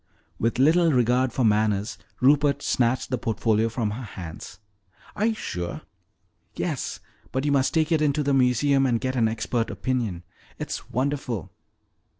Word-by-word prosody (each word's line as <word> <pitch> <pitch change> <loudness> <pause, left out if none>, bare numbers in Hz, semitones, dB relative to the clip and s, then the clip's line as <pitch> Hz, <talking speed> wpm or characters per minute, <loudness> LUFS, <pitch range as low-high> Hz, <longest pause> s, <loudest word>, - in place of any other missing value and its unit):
With 115 +1 0
little 160 +5 +4
regard 125 0 +2
for 130 - -1
manners, 105 -1 +1 0.2
Rupert 145 +1 +3
snatched 125 +1 +1
the 125 - 0
portfolio 110 0 +1
from 110 -2 -2
her 115 +5 -5
hands. 90 -7 -8 0.6
"Are 210 +2 +1
you 225 - 0
sure?" 85 - -5 0.7
"Yes. - - -3 0.3
But 130 +3 -1
you 145 - +2
must 135 -2 +2
take 160 0 +1
it 160 -2 +3
in 150 -1 +3
to 150 +1 0
the 140 0 +1
museum 135 +1 +3
and 120 -2 +1
get 130 +1 -2
an 115 -3 +3
expert 115 +1 -1
opinion. 115 -9 -2 0.3
It's - - -5
wonderful!" 130 - -2
125 Hz, 155 wpm, -25 LUFS, 115-140 Hz, 0.7 s, little